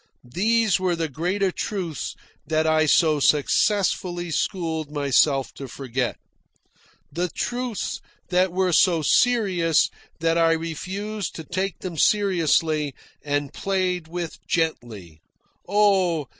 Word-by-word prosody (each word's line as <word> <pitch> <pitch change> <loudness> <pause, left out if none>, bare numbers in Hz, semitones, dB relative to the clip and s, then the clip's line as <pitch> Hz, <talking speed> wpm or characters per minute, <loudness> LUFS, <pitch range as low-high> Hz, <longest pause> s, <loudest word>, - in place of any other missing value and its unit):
These 220 +2 +2
were 185 -2 0
the 165 -1 -2
greater 180 +7 -1
truths 180 -6 -4 0.3
that 155 0 +1
I 155 0 +3
so 155 0 +4
successfully 175 +3 +1
schooled 160 -3 -2
myself 140 -1 +2
to 135 - -8
forget; 130 -1 -3 0.9
the 175 +1 -2
truths 245 +3 -3 0.3
that 185 0 +2
were 185 0 +1
so 170 -2 +4
serious 185 - +3 0.3
that 165 +1 +1
I 165 0 +4
refused 190 +5 -4
to 160 - -6
take 190 +4 -3
them 180 -3 -6
seriously, 160 -7 +2 0.3
and 145 -1 -2
played 185 -3 -1
with 170 0 -5
gently, 110 - -3 0.5
oh! 190 -6 +3
170 Hz, 115 wpm, -23 LUFS, 155-190 Hz, 0.9 s, so